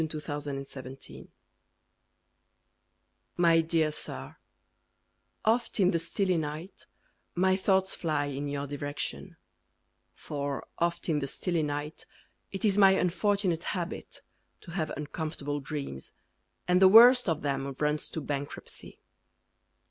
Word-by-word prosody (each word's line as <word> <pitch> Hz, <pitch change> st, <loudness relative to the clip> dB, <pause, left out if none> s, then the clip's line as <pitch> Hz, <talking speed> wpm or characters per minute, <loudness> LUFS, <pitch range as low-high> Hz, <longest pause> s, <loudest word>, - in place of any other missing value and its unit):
TO 155 Hz, -, -4 dB
AN 145 Hz, -2 st, -4 dB
HOTEL 130 Hz, -1 st, -9 dB
KEEPER 135 Hz, -, -11 dB, 2.1 s
My 165 Hz, -1 st, +5 dB
dear 160 Hz, -1 st, +1 dB
Sir, -, -, -3 dB, 1.1 s
Oft 230 Hz, +1 st, +1 dB
in 185 Hz, -1 st, +5 dB
the 170 Hz, -, +1 dB
stilly 180 Hz, +2 st, 0 dB
night 155 Hz, +4 st, -6 dB, 0.5 s
My 185 Hz, +1 st, +3 dB
thoughts 190 Hz, 0 st, +2 dB
fly 155 Hz, -4 st, -1 dB
In 145 Hz, 0 st, -4 dB
your 140 Hz, 0 st, -3 dB
direction, 145 Hz, +5 st, -5 dB, 0.8 s
For 140 Hz, -1 st, -4 dB
oft 170 Hz, 0 st, 0 dB
in 155 Hz, -3 st, +1 dB
the 140 Hz, -, -3 dB
stilly 170 Hz, +4 st, -1 dB
night 145 Hz, +1 st, -4 dB, 0.4 s
It 195 Hz, +2 st, -2 dB
is 205 Hz, -1 st, +3 dB
my 195 Hz, -1 st, +8 dB
unfortunate 185 Hz, -1 st, +1 dB
habit 175 Hz, 0 st, -6 dB, 0.4 s
To 170 Hz, -, -11 dB
have 165 Hz, -3 st, -2 dB
uncomfortable 150 Hz, -1 st, -4 dB
dreams, 140 Hz, -, -6 dB, 0.5 s
And 180 Hz, +1 st, +3 dB
the 190 Hz, -, +9 dB
worst 240 Hz, +2 st, +8 dB
of 160 Hz, -2 st, -1 dB
them 140 Hz, -1 st, -1 dB
Runs 150 Hz, 0 st, -1 dB
to 160 Hz, -, -4 dB
bankruptcy. 140 Hz, 0 st, -5 dB
160 Hz, 125 wpm, -29 LUFS, 145-185 Hz, 2.1 s, the